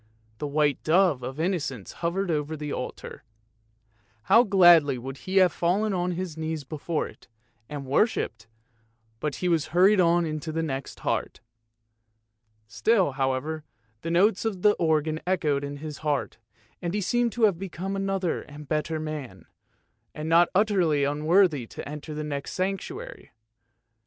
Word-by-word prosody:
The 150 - -2
white 145 -1 +1
dove 170 -4 +3
of 130 +4 -6
Innocence 160 - -2
hovered 175 +2 0
over 155 0 -2
the 150 -1 -4
altar. 125 - -6 1.0
How 210 - +6
gladly 175 - +6
would 135 +2 -7
he 190 - +1
have 185 -2 +6
fallen 195 +5 +1
on 180 -1 -1
his 175 -2 -4
knees 160 -1 -3
before 155 +3 -3
it, - - -16 0.4
and 145 -2 -6
worshipped, 135 - 0 0.7
but 150 +1 -2
he 180 - -2
was 165 -4 +1
hurried 195 +3 +6
on 170 0 +3
into 155 0 -4
the 165 +1 -1
next 135 -3 -5
heart. - - -2 1.3
Still, 175 - +2
however, 135 +4 -2 0.4
the 165 - -4
notes 190 +4 +3
of 205 -5 -3
the 210 - +6
organ 155 -1 +1
echoed 150 -6 +1
in 145 0 -5
his 150 0 -7
heart, 150 -3 -2 0.4
and 175 +2 -2
he 210 - 0
seemed 240 +4 +1
to 240 - -2
have 200 -6 +4
become 190 +1 -4
another 195 -3 -1
and 145 +1 -11
a - - -15
better 155 +2 -1
man, 145 - -6 0.7
and 150 +1 -5
not 170 +1 +5
utterly 185 -8 +3
unworthy 150 -1 +2
to - - -8
enter 150 +1 -7
the 155 - -3
next 145 -2 -4
sanctuary. 370 - -4
160 Hz, 155 wpm, -26 LUFS, 145-185 Hz, 1.3 s, How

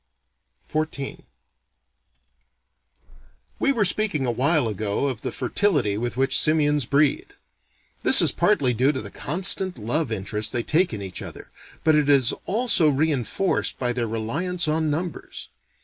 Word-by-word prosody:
XIV 155 -3 -4 2.3
We 275 - +2
were 225 -6 0
speaking 185 -7 0
a 120 - 0
while 140 +2 +1
ago 105 +3 -3
of 130 -5 -4
the 130 - -4
fertility 130 - 0
with 120 +3 -4
which 135 0 +2
simians 150 -3 +1
breed. 145 0 0 0.7
This - - +9
is - - +5
partly 130 -3 +1
due 130 +5 +1
to 130 - -4
the 100 - -8
constant 185 +4 +3
love 120 +5 -2
interest 105 +1 -3
they 120 - -2
take 175 +8 +1
in 105 -3 -6
each 95 -2 -7
other, - - -11 0.3
but 160 - +3
it 150 -1 +1
is 135 -4 +3
also 210 -7 +2
reenforced 150 +5 -1
by 125 -1 -2
their 120 -1 -3
reliance 155 +11 -2
on 155 0 -1
numbers. 165 +2 -5
140 Hz, 145 wpm, -23 LUFS, 120-160 Hz, 2.3 s, This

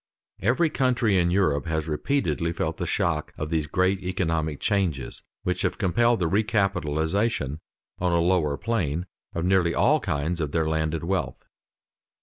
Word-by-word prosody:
Every 130 - +2
country 120 -7 +2
in 85 0 +2
Europe 85 -5 +1
has 80 -1 -1
repeatedly 85 - 0
felt - - -2
the - - -3
shock 80 -3 -1
of 75 - -4
these 80 -2 0
great 95 +4 +1
economic 80 -5 -1
changes 95 -10 -1 0.2
which - - -1
have - - 0
compelled 115 +4 +2
the 85 - +2
recapitalization 95 - 0 0.4
on 90 0 +1
a 85 - +3
lower 85 -5 +2
plane, 90 -8 -1 0.3
of 85 0 -1
nearly 90 -3 +3
all - - +4
kinds 80 +4 -2
of 75 -2 -3
their 80 -1 +1
landed 80 0 -1
wealth. 95 +2 -2
85 Hz, 150 wpm, -25 LUFS, 80-100 Hz, 0.4 s, all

